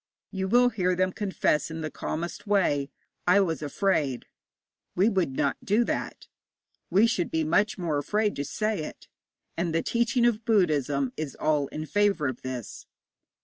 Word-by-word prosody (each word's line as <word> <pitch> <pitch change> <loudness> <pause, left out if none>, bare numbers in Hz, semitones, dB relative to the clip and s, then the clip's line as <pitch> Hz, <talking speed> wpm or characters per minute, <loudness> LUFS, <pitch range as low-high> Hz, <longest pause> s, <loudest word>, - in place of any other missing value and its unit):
You 190 -1 -2
will 245 +4 +5
hear 185 -5 0
them 185 +1 +1
confess 190 -7 0
in 160 0 -5
the 155 -1 -4
calmest 170 +5 -5
way, 155 -9 +2 0.4
'I 190 +3 +6
was 165 -7 -1
afraid.' 145 -4 0 0.7
We 195 +5 +4
would 185 -10 0
not 140 - 0
do 215 +4 +3
that; - - -4 0.6
we 200 +5 +5
should 190 -7 0
be 160 0 0
much 205 +7 +2
more 165 -5 -1
afraid 210 +8 0
to 140 - -1
say 215 +8 -2
it. - - -9 0.5
And 170 -1 -1
the 165 - +1
teaching 235 +1 +1
of 230 -2 +1
Buddhism 145 - +1
is 155 -3 -4
all 150 -2 +1
in 155 +2 -6
favour 205 -3 +1
of 130 -2 -4
this. 130 -3 -6
180 Hz, 165 wpm, -27 LUFS, 150-205 Hz, 0.7 s, I